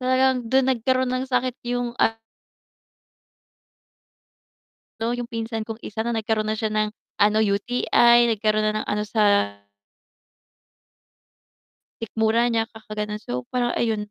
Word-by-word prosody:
Talagang 255 Hz, -2 st, +1 dB
dun 265 Hz, 0 st, +3 dB
nagkaroon 260 Hz, +1 st, +1 dB
ng 255 Hz, +1 st, -2 dB
sakit 250 Hz, 0 st, +1 dB, 0.2 s
yung 245 Hz, -1 st, -2 dB
a 225 Hz, 0 st, +2 dB, 2.8 s
no, 225 Hz, +1 st, 0 dB
yung 245 Hz, 0 st, -3 dB
pinsan 225 Hz, -2 st, -4 dB
kong 225 Hz, 0 st, -7 dB
isa 220 Hz, +2 st, -4 dB
na 235 Hz, -, -1 dB
nagkaroon 220 Hz, -1 st, -1 dB
na 215 Hz, -, 0 dB
siya 220 Hz, 0 st, -2 dB
ng 215 Hz, 0 st, +1 dB, 0.3 s
ano 210 Hz, +1 st, +4 dB
UTI, 235 Hz, +3 st, +3 dB
nagkaroon 215 Hz, 0 st, +1 dB
na 215 Hz, 0 st, +1 dB
ng -, -, -12 dB
ano 210 Hz, 0 st, -1 dB
sa 215 Hz, +1 st, 0 dB, 2.8 s
sikmura 225 Hz, +2 st, +1 dB
niya 225 Hz, -1 st, +1 dB
kakagano'n, 215 Hz, -1 st, -5 dB
so 125 Hz, -7 st, -5 dB
parang 245 Hz, -1 st, +1 dB
ayun, 215 Hz, -3 st, -1 dB
225 Hz, 130 wpm, -23 LUFS, 215-245 Hz, 2.8 s, ano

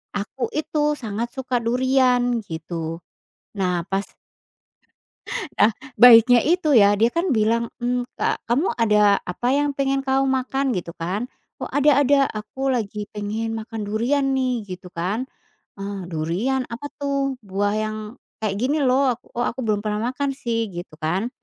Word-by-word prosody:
aku 210 Hz, +6 st, -3 dB
itu 300 Hz, -1 st, 0 dB
sangat 225 Hz, -2 st, -4 dB
suka 255 Hz, -2 st, -1 dB
durian 245 Hz, 0 st, +2 dB
gitu, 165 Hz, -2 st, -6 dB, 0.5 s
nah 180 Hz, -3 st, 0 dB
pas 195 Hz, +1 st, -1 dB, 1.5 s
Nah 220 Hz, -, +6 dB, 0.3 s
baiknya 240 Hz, 0 st, +9 dB
itu 320 Hz, +1 st, +2 dB
ya 205 Hz, -4 st, +6 dB
dia 230 Hz, -, +4 dB
kan 340 Hz, +2 st, 0 dB
bilang, 230 Hz, +2 st, +1 dB
mmm, 245 Hz, 0 st, 0 dB
"Ka -, -, 0 dB
kamu 275 Hz, +10 st, +2 dB
ada 210 Hz, -3 st, +4 dB
apa 180 Hz, +7 st, -4 dB
yang 290 Hz, 0 st, +2 dB
pengen 275 Hz, 0 st, +1 dB
kamu 270 Hz, 0 st, +2 dB
makan?" 265 Hz, 0 st, 0 dB
Gitu 175 Hz, -3 st, -4 dB
kan, 195 Hz, +9 st, -3 dB, 0.3 s
"oh -, -, -4 dB
ada 285 Hz, 0 st, +4 dB
ada 275 Hz, 0 st, +4 dB
aku 265 Hz, +6 st, -3 dB
lagi 210 Hz, -3 st, -3 dB
pengen 215 Hz, +2 st, -3 dB
makan 220 Hz, -1 st, -5 dB
durian 235 Hz, +7 st, 0 dB
nih" 250 Hz, -4 st, 0 dB
gitu 180 Hz, 0 st, -8 dB
kan, 195 Hz, +9 st, -2 dB, 0.5 s
eee, 200 Hz, 0 st, -5 dB
"durian 180 Hz, +12 st, -1 dB
apa 235 Hz, +5 st, -6 dB
tuh?" 275 Hz, -2 st, -1 dB
"Buah 200 Hz, +1 st, -1 dB
yang 215 Hz, 0 st, -2 dB, 0.4 s
kayak 215 Hz, -3 st, -1 dB
gini 275 Hz, +6 st, +1 dB
loh," 255 Hz, -1 st, +3 dB, 0.2 s
"oh 240 Hz, -, +1 dB
aku 245 Hz, -, -2 dB
belum 210 Hz, -2 st, +1 dB
pernah 215 Hz, +3 st, -1 dB
makan 275 Hz, +1 st, -1 dB
sih" 230 Hz, -5 st, -2 dB
gitu 175 Hz, -2 st, -8 dB
kan 180 Hz, +9 st, -1 dB
235 Hz, 150 wpm, -22 LUFS, 205-265 Hz, 1.5 s, baiknya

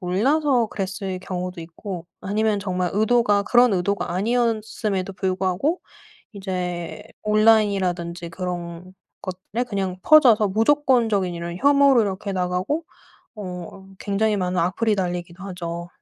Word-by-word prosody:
몰라서 245 Hz, -, +2 dB
그랬을 195 Hz, -1 st, -4 dB
경우도 180 Hz, -1 st, -5 dB
있고 170 Hz, +1 st, -7 dB, 0.2 s
아니면 210 Hz, +1 st, 0 dB
정말 185 Hz, -2 st, -1 dB
의도가 215 Hz, -1 st, +3 dB
그런 240 Hz, +1 st, +4 dB
의도가 190 Hz, +1 st, -1 dB
아니었음에도 215 Hz, -3 st, -1 dB
불구하고 190 Hz, -, -1 dB, 0.5 s
이제 180 Hz, -4 st, -4 dB, 0.2 s
온라인이라든지 195 Hz, -6 st, +2 dB
그런 175 Hz, 0 st, -6 dB, 0.3 s
것들에 185 Hz, +6 st, -4 dB
그냥 190 Hz, -3 st, -2 dB
퍼져서 245 Hz, -9 st, +6 dB
무조건적인 225 Hz, -4 st, +2 dB
이런 170 Hz, +1 st, -5 dB
혐오로 280 Hz, 0 st, +5 dB
이렇게 200 Hz, -1 st, -2 dB
나가고 185 Hz, -, -1 dB, 0.5 s
어 185 Hz, -1 st, -8 dB
굉장히 210 Hz, +1 st, 0 dB
많은 180 Hz, -1 st, -1 dB
악플이 205 Hz, +6 st, +1 dB
달리기도 180 Hz, -1 st, -4 dB
하죠. 170 Hz, -3 st, -5 dB
195 Hz, 315 characters per minute, -23 LUFS, 180-220 Hz, 0.5 s, 퍼져서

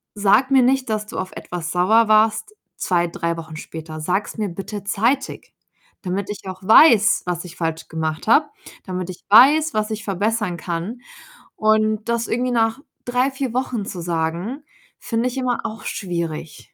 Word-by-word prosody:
„Sag 205 Hz, +6 st, +3 dB
mir 265 Hz, -2 st, +6 dB
nicht, 260 Hz, -1 st, +1 dB
dass 215 Hz, -1 st, -1 dB
du -, -, -8 dB
auf 185 Hz, 0 st, -4 dB
etwas 175 Hz, -2 st, -6 dB
sauer 215 Hz, +6 st, +4 dB
warst 220 Hz, -, +3 dB, 0.2 s
2, 175 Hz, -2 st, +1 dB
3 170 Hz, 0 st, -3 dB
Wochen 160 Hz, -1 st, -8 dB
später. 160 Hz, 0 st, -8 dB
Sag's 185 Hz, +7 st, -2 dB
mir 210 Hz, -3 st, -1 dB
bitte 195 Hz, +3 st, -6 dB
zeitig, 235 Hz, +7 st, -1 dB, 0.5 s
damit 190 Hz, +2 st, -3 dB
ich 200 Hz, -1 st, -8 dB
auch 185 Hz, 0 st, -7 dB
weiß, 220 Hz, 0 st, +6 dB
was 180 Hz, 0 st, -3 dB
ich 170 Hz, -, -11 dB
falsch 165 Hz, -1 st, -3 dB
gemacht 160 Hz, -1 st, -3 dB
habe, 295 Hz, +7 st, +5 dB, 0.4 s
damit 185 Hz, -1 st, -4 dB
ich 180 Hz, -, -13 dB
weiß, 290 Hz, +8 st, +6 dB
was 215 Hz, 0 st, -1 dB
ich 215 Hz, 0 st, -4 dB
verbessern 205 Hz, 0 st, -1 dB
kann.“ 175 Hz, +9 st, -5 dB, 0.5 s
Und 215 Hz, +1 st, +1 dB
das 235 Hz, 0 st, 0 dB
irgendwie 250 Hz, +2 st, -1 dB
nach 225 Hz, +1 st, +1 dB, 0.3 s
3, 250 Hz, +2 st, +1 dB
4 265 Hz, -3 st, -4 dB
Wochen 245 Hz, -5 st, -2 dB
zu 180 Hz, -3 st, -6 dB
sagen, 170 Hz, -, -3 dB, 0.4 s
finde 230 Hz, +1 st, -1 dB
ich 260 Hz, -, -8 dB
immer 250 Hz, -2 st, -1 dB
auch 220 Hz, -1 st, -6 dB
schwierig. 170 Hz, -4 st, -5 dB
210 Hz, 170 wpm, -21 LUFS, 175-235 Hz, 0.5 s, mir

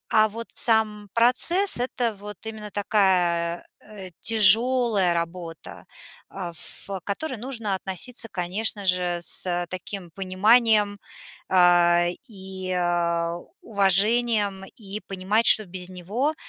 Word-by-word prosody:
А 215 Hz, 0 st, +5 dB
вот 230 Hz, +2 st, -8 dB
сам 215 Hz, -3 st, +1 dB
процесс- 295 Hz, +12 st, +5 dB
это 245 Hz, -2 st, -2 dB
вот 205 Hz, 0 st, -10 dB
именно 215 Hz, -1 st, -7 dB
такая, 180 Hz, -4 st, 0 dB
э, 200 Hz, -3 st, -12 dB
тяжелая 225 Hz, -2 st, +4 dB
работа, 170 Hz, -1 st, -7 dB, 0.4 s
э, 180 Hz, -3 st, -7 dB
ф 165 Hz, -, -7 dB
к 195 Hz, -2 st, -6 dB
которой 255 Hz, +6 st, -5 dB
нужно 230 Hz, -3 st, -4 dB
относиться, 195 Hz, +6 st, -5 dB
конечно 195 Hz, +4 st, -1 dB
же, 180 Hz, -1 st, 0 dB
с 175 Hz, 0 st, -1 dB
таким 185 Hz, -1 st, -7 dB
пониманием, 205 Hz, +3 st, +2 dB, 0.5 s
а, 175 Hz, -1 st, +4 dB, 0.2 s
и 190 Hz, -3 st, -8 dB, 0.9 s
уважением, 205 Hz, 0 st, +1 dB
и 205 Hz, -1 st, -7 dB
понимать, 195 Hz, +4 st, 0 dB
что 215 Hz, -, +6 dB
без 180 Hz, 0 st, -6 dB
него 210 Hz, -, -3 dB
200 Hz, 110 wpm, -23 LUFS, 185-225 Hz, 0.9 s, что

